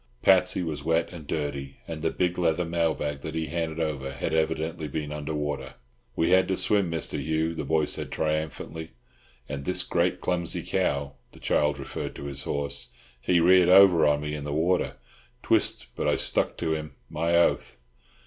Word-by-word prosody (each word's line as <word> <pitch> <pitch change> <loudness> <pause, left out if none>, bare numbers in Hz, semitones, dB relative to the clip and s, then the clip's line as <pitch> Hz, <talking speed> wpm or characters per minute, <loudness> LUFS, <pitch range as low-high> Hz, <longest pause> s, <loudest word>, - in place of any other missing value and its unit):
Patsy 90 - +4
was 80 -3 -4
wet 80 0 +1
and 80 -5 -10
dirty, 70 -3 -3
and 80 -2 -5
the 80 - +1
big 90 +1 -1
leather 85 0 +1
mail 85 -1 +1
bag 75 -1 -4
that 80 0 -6
he 80 0 -1
handed 80 -1 -3
over 70 -4 -2
had 70 +4 -3
evidently 80 0 -1
been 75 0 -4
under 75 +1 -4
water. 70 -3 -3 0.4
"We 80 - +1
had 95 0 +5
to 95 - 0
swim, 100 -4 +2
Mr. 80 -1 -3
Hugh," 80 +1 0
the 80 -2 -4
boy 80 +1 +2
said - - -3
triumphantly, 80 0 -3 0.5
"and 70 -1 -5
this 90 +3 -1
great, 85 +1 0
clumsy 85 -2 -2
cow" 70 0 -1 0.2
(the - - -14
child 75 -2 +1
referred 70 -1 -5
to - - -8
his 70 -1 -5
horse), 70 0 -2 0.3
"he 90 +5 +3
reared 90 +1 +6
over 90 -4 +7
on 75 0 +2
me 75 0 -4
in 75 -1 -4
the 75 - -4
water, 85 +4 +1 0.5
twyst, - - +1
but - - -1
I - - +3
stuck - - 0
to 80 -2 0
him. 75 -3 -5
My 85 +5 0
oath!" 85 - +2
80 Hz, 185 wpm, -27 LUFS, 75-85 Hz, 0.5 s, over